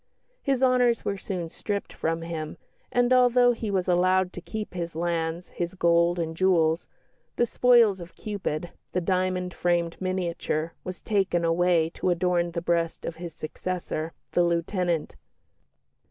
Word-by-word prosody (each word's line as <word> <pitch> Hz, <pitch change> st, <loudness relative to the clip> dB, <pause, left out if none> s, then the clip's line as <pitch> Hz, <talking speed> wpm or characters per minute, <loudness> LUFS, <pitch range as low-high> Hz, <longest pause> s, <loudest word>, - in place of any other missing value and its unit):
His 270 Hz, -2 st, +1 dB
honours 250 Hz, -2 st, +3 dB
were 200 Hz, -, 0 dB
soon 180 Hz, -4 st, -4 dB
stripped 200 Hz, +4 st, -4 dB
from 165 Hz, +1 st, -2 dB
him, 160 Hz, -2 st, -5 dB, 0.3 s
and 245 Hz, +1 st, +3 dB
although 245 Hz, -1 st, +5 dB
he 230 Hz, -2 st, -3 dB
was 190 Hz, -2 st, 0 dB
allowed 185 Hz, +1 st, +3 dB
to 180 Hz, -, -7 dB
keep 215 Hz, +2 st, -6 dB
his 170 Hz, -2 st, -4 dB
lands, 170 Hz, 0 st, -2 dB
his 175 Hz, +1 st, -4 dB
gold 170 Hz, 0 st, +3 dB
and 165 Hz, -1 st, -2 dB
jewels, 165 Hz, -3 st, +2 dB, 0.5 s
the 240 Hz, -, +3 dB
spoils 235 Hz, -5 st, +4 dB
of 170 Hz, -1 st, -10 dB
Cupid, 180 Hz, -6 st, -4 dB, 0.2 s
the 180 Hz, -, +2 dB
diamond 185 Hz, 0 st, 0 dB
framed 170 Hz, -1 st, 0 dB
miniature, 170 Hz, -3 st, -2 dB
was 185 Hz, 0 st, -7 dB
taken 190 Hz, -5 st, +1 dB
away 165 Hz, -1 st, +3 dB
to -, -, -1 dB
adorn 175 Hz, -1 st, +1 dB
the 170 Hz, -1 st, -3 dB
breast 170 Hz, -1 st, 0 dB
of 165 Hz, -, -5 dB
his 170 Hz, -2 st, -7 dB
successor, 165 Hz, 0 st, -4 dB, 0.2 s
the 175 Hz, -, +3 dB
lieutenant. 170 Hz, -1 st, 0 dB
175 Hz, 150 wpm, -26 LUFS, 170-190 Hz, 0.5 s, although